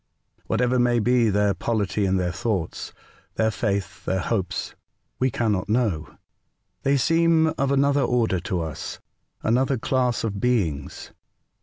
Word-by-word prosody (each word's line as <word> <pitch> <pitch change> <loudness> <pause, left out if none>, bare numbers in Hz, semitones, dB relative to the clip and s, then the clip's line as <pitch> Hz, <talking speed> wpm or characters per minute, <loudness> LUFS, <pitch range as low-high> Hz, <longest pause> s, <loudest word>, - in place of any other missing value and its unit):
Whatever 125 0 +1
may 120 0 +3
be 120 0 +3
their 105 0 +2
polity, 100 0 -1
their 90 -2 +1
thoughts, 95 -2 -3 0.4
their 110 0 +2
faith, 100 -4 -2
their 95 - 0
hopes, 95 -2 -2 0.5
we 130 - +2
cannot 110 -5 -1
know. 105 -9 0 0.6
They 140 +1 +2
seem 165 +2 +3
of 135 0 0
another 140 +1 +3
order 115 -8 +1
to 90 0 -2
us, 80 -2 -6 0.2
— - - -50
another 130 +4 +2
class 125 +1 0
of 100 -3 -2
beings. 95 - -1
115 Hz, 135 wpm, -24 LUFS, 95-125 Hz, 0.6 s, may